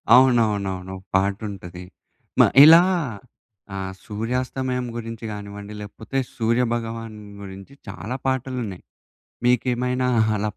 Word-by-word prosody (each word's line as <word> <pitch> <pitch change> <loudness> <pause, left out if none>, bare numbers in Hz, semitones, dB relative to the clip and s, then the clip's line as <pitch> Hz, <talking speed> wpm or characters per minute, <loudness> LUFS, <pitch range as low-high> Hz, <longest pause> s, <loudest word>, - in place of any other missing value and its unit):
అవునవునవును. 105 -7 +3
ఒక 95 - -14
పాటుంటది. 95 -2 -3 0.6
మా - - +8 0.2
ఇలా 165 +3 +10 0.9
ఆహ్, 95 -1 -4
సూర్యాస్తమయం 125 +3 -2
గురించి 115 -1 -6
గానివ్వండి, 100 0 -8
లేకపోతే 110 +5 -6 0.2
సూర్య 115 +1 +2
భగవాన్ 115 -1 -4 0.2
గురించి 95 +5 -10
చాలా 100 +6 -5
పాటలున్నయి. 125 -7 -2 0.6
మీకేమైనా 125 +1 +1 0.3
అలా 105 +1 -1
115 Hz, 95 wpm, -23 LUFS, 100-125 Hz, 0.9 s, ఇలా